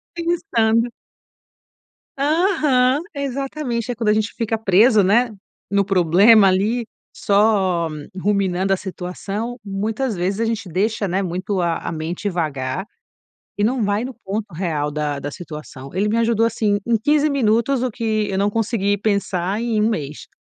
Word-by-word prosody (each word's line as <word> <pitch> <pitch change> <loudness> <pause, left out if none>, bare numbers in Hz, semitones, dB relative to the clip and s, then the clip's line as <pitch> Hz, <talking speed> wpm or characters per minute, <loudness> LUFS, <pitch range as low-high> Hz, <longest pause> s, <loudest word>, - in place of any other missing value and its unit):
pensando. 245 -10 +1 1.3
Aham. 290 -4 +2
Exatamente. 270 -3 -3
É - - -4
quando 225 -1 0
a - - +5
gente 215 0 -1
fica 225 -1 -1
preso, 215 +1 +4
né, 230 +6 +3 0.4
no 200 0 +2
problema 195 +3 +5
ali, 210 +5 +1 0.3
só 200 -5 +2 0.3
ruminando 195 -1 0
a - - +1
situação, 195 +6 -5
muitas 215 +4 -2
vezes 185 +3 -1
a 230 - +1
gente 225 -3 -2
deixa, 205 +4 0
né, 190 +2 0
muito 185 +1 -2
a 170 -1 0
a - - -5
mente 165 +5 -4
vagar 145 -5 -2 0.7
e 205 - -1
não 245 +2 +1
vai 205 +2 0
no 260 0 -6
ponto 205 +1 -4
real 155 -4 -1
da 150 -1 -2
da 145 +1 -5
situação. 150 -4 -9
Ele 200 +4 0
me 215 - 0
ajudou 230 -1 +2
assim 210 -3 +1
em 235 -1 +3
15 295 +7 +2
minutos, 245 -1 +1
o 255 - 0
que 215 -2 -1
eu 190 - -1
não 200 +1 +2
consegui 205 -2 0
pensar 200 -1 -1
em 230 -2 0
um 215 - +3
mês. 150 -8 -5
210 Hz, 155 wpm, -20 LUFS, 185-235 Hz, 1.3 s, a